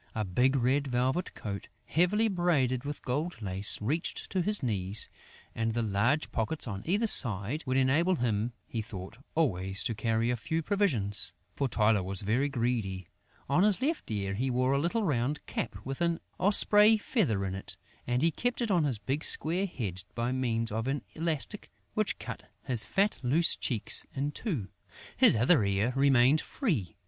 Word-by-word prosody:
A 110 -1 -1
big 125 +9 +2
red 135 +3 +1
velvet 130 +7 -1
coat, 100 -2 -6 0.2
heavily 200 +7 +2
braided 145 - +1
with 145 +1 -6
gold 150 +5 -3
lace, 100 -1 0
reached 150 - -3
to 185 - 0
his 210 -2 +2
knees; 100 -3 +1 0.5
and 115 0 -2
the 120 - 0
large 115 +9 0
pockets 120 +6 -1
on 100 -3 -5
either 205 +6 +2
side 120 - +3
would 130 +1 +1
enable 150 +8 +3
him, 115 -4 -1
he 115 - -4
thought, 105 -1 -9 0.2
always 95 - 0
to 115 - -1
carry 115 +2 0
a - - 0
few 160 +8 -3
provisions; 120 - 0 0.2
for 140 - 0
Tylô 110 -4 +2
was 95 +1 +1
very 120 +8 +1
greedy. 115 -8 -2 0.4
On 140 +6 +2
his 205 -1 +5
left 300 +5 -2
ear, 100 -3 -2
he 125 +7 -1
wore 130 +1 +1
a 140 - +2
little 175 +9 0
round 140 -3 -1
cap 110 - -4
with 135 +4 -5
an 170 -1 +1 0.2
osprey 210 +3 +5
feather 150 - 0
in 95 - -3
it 95 -1 -5 0.3
and 125 +3 0
he 165 - +4
kept 245 +8 -2
it 235 -4 -1
on 170 -5 +3
his 130 -6 0
big 130 +9 -3
square 180 +5 +2
head 95 - -5
by 120 +1 -1
means 115 -3 -1
of 110 +3 -2
an 135 -1 -2
elastic 160 -3 -2 0.2
which - - 0
cut - - -8
his 120 -4 -1
fat, 195 - 0
loose 145 +7 +3
cheeks 115 -6 +2
in 140 +2 -1
two. 150 - -4 0.5
His - - +6
other 125 +3 +4
ear 100 +5 0
remained 135 +1 +4
free. 140 - -2
130 Hz, 175 wpm, -29 LUFS, 110-165 Hz, 0.5 s, His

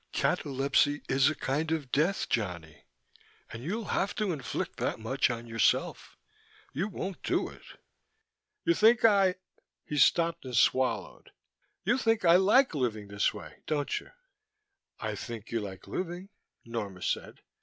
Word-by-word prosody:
"Catalepsy 140 +1 +1
is 135 +2 +4
a 155 - -2
kind 150 +5 -1
of 150 -6 -2
death, 160 +8 +1
Johnny. 85 -8 -3 0.7
And 115 - -7
you'll 205 - -3
have 195 - 0
to 215 -4 0
inflict 140 -8 -4
that - - -2
much 130 +5 +1
on 120 -1 -4
yourself. 115 0 0 0.6
You 170 +9 -1
won't 190 -2 -5
do - - 0
it." - - -14 1.0
"You 340 - +4
think 225 -3 +5
I 195 -4 +5 0.3
" - - -57
He 150 - -2
stopped 170 +3 +3
and 125 -3 -3
swallowed. 130 +3 +1 0.5
"You 240 +6 +2
think 225 -5 +1
I 170 +1 +7
like 210 +7 +4
living 110 -7 -2
this 100 +1 +1
way, - - -10
don't 145 -2 -1
you?" - - -16 0.9
"I - - -3
think 115 -3 -7
you 115 - 0
like 95 -3 -7
living," 180 +1 -5 0.4
Norma 105 -6 -5
said. - - -3
145 Hz, 150 wpm, -29 LUFS, 115-185 Hz, 1.0 s, I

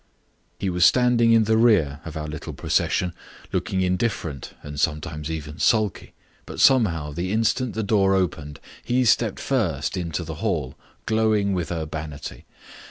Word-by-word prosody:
He 95 - -1
was 90 0 +1
standing 120 +1 +4
in 115 -1 +5
the 110 +1 +2
rear 80 -12 +3
of 80 -1 -6
our 75 - -4
little 75 -1 -6
procession, 90 -1 0 0.4
looking 95 - -1
indifferent 90 - -2
and 75 0 -7
sometimes 75 0 -2
even 75 -1 -6
sulky, 110 -5 +1 0.3
but - - -8
somehow 85 - +3
the 85 +5 -3
instant 115 +3 0
the 110 - -1
door 100 -2 +3
opened 80 -6 -2 0.2
he 125 +1 +1
stepped 110 -1 +2
first 95 - -1
into 85 -2 -3
the 80 -1 -6
hall, - - -1 0.3
glowing 110 -2 +2
with 90 -3 -2
urbanity. 80 -3 -6
90 Hz, 150 wpm, -23 LUFS, 75-110 Hz, 0.4 s, in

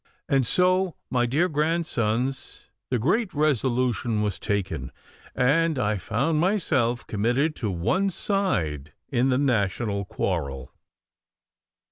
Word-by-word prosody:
And 135 -3 +2
so, 185 0 +2 0.2
my 120 -1 +2
dear 150 +9 +2
grandsons, 135 -6 -1 0.2
the 125 - +1
great 185 - 0
resolution 125 -6 +1
was 105 -3 -2
taken, 100 -2 -2 0.4
and 150 +5 +2
I 105 -3 +1
found 135 - 0
myself 155 - +1
committed 125 +9 0
to 110 - -2
one 140 - +1
side 90 - -1 0.2
in 130 0 +2
the 125 - +2
national 105 -5 0
quarrel. 70 -10 -3
125 Hz, 110 wpm, -25 LUFS, 105-160 Hz, 0.4 s, And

